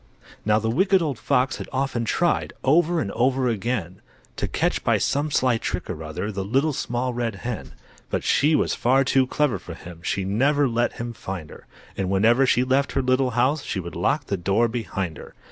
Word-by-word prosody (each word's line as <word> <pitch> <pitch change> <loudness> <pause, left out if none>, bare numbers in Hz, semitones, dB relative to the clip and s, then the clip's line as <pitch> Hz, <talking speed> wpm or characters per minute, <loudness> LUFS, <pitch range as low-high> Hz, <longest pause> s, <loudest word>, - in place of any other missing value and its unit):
Now, 105 0 +3
the 110 +1 -1
Wicked 190 - +3
Old 140 -7 -2
Fox 130 +2 +1
had - - -7
often 130 -3 -1
tried 175 +8 0
Over 170 +4 +3
and 100 - -3
over 130 +2 +1
again, 105 -5 -2 0.4
To - - -1
catch - - -1
by - - +3
some 145 +2 0
sly 125 -5 +2
trick 90 -3 -3
or 80 -2 -6
other 80 +7 -4
The 95 -1 -3
Little 135 +10 +1
Small 125 0 -2
Red 120 -3 -2
Hen. 120 -4 -5 0.4
But - - -2
she 150 +3 +3
was - - +1
far 130 +3 +3
too 130 0 +2
clever 130 -8 0
for 85 -1 -9
him, 85 0 -11
She 95 +2 -1
never 140 +8 +2
let 120 0 0
him 120 0 -5
find 95 -7 -7
her, - - -14 0.3
And 95 -1 -2
whenever 115 +7 +4
she 125 - +3
left 135 +2 +1
her 135 - +1
little 130 +1 +2
house 140 +5 +2
She 100 - -3
would 85 -1 -7
lock 140 - 0
the 100 - -2
door 100 +6 +2
behind 95 -8 -4
her. - - -12
120 Hz, 205 wpm, -24 LUFS, 100-135 Hz, 0.4 s, whenever